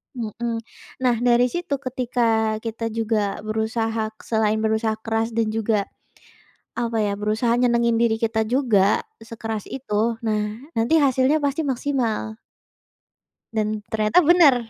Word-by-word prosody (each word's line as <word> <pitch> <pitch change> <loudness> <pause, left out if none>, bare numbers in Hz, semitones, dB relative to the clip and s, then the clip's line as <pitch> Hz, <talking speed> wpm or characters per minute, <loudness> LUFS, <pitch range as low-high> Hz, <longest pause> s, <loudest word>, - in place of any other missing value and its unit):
Mhm. 230 0 -4 0.4
Nah, 250 -2 +4
dari 245 0 +3
situ 345 -5 -2
ketika 240 -4 0
kita 230 0 -3
juga 220 -2 -1
berusaha 220 +1 -1
k - - -55
selain 220 -1 +1
berusaha 220 0 +1
keras 225 0 -1
dan 225 -2 +1
juga, 215 -2 0 0.9
apa 230 -1 -1
ya, 205 -1 0
berusaha 215 +3 0
nyenengin 235 -1 +2
diri 230 -1 +3
kita 220 -1 0
juga 220 -6 +2 0.2
sekeras 225 -2 -6
itu. 230 -3 -1
Nah, 215 +6 -2
nanti 235 +9 +3
hasilnya 265 +3 +3
pasti 285 +3 0
maksimal. 235 -5 -1 1.1
Dan 215 -1 -1
ternyata 215 +8 +3
benar, 330 -5 +7
225 Hz, 125 wpm, -23 LUFS, 220-245 Hz, 1.1 s, benar